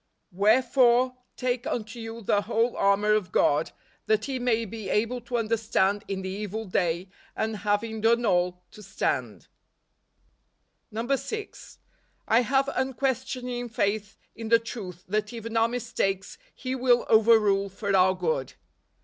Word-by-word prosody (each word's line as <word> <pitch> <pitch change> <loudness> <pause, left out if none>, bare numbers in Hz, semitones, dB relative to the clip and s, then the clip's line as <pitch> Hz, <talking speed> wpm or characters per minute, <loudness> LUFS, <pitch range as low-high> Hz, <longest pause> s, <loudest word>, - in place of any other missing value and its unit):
" - - -50
Wherefore, 250 +2 +4 0.2
take 250 -1 -1
unto 225 +1 -4
you 225 0 -7
the 205 +1 +2
tchole 230 +3 0
armor 200 +2 +3
of 210 -5 0
God, 145 +2 +2 0.4
that 215 +2 +1
ye 265 -2 -2
may 230 -2 +1
be 220 0 -7
able 230 +4 0
to 240 +1 -5
withstand 215 -3 +1
in 190 -1 -4
the 190 - -3
evil 210 +3 -4
day, 180 -1 -1 0.3
and 220 -1 -2
having 210 +2 -1
done 235 +2 +3
all, 180 -2 +1
to 215 - -13
stand" 200 -1 -3 1.4
NOVEMBER. 230 +3 -4
125 270 - +1
6. 430 -1 -7 0.5
I 230 +2 +5
have 270 +2 +1
unquestioning 255 -2 -2
faith 210 0 -1 0.2
in 225 -1 -7
the 230 - +7
truth 200 -6 -8
that 210 +3 -1
even 230 0 -6
our 225 0 +4
mistakes 200 -5 -2 0.2
He 255 -1 -4
will 250 -2 +3
over¬ 225 +1 +6
rule 200 -1 +1
for 200 +1 -2
our 185 0 +4
good. 160 -7 -2
220 Hz, 150 wpm, -26 LUFS, 200-240 Hz, 1.4 s, the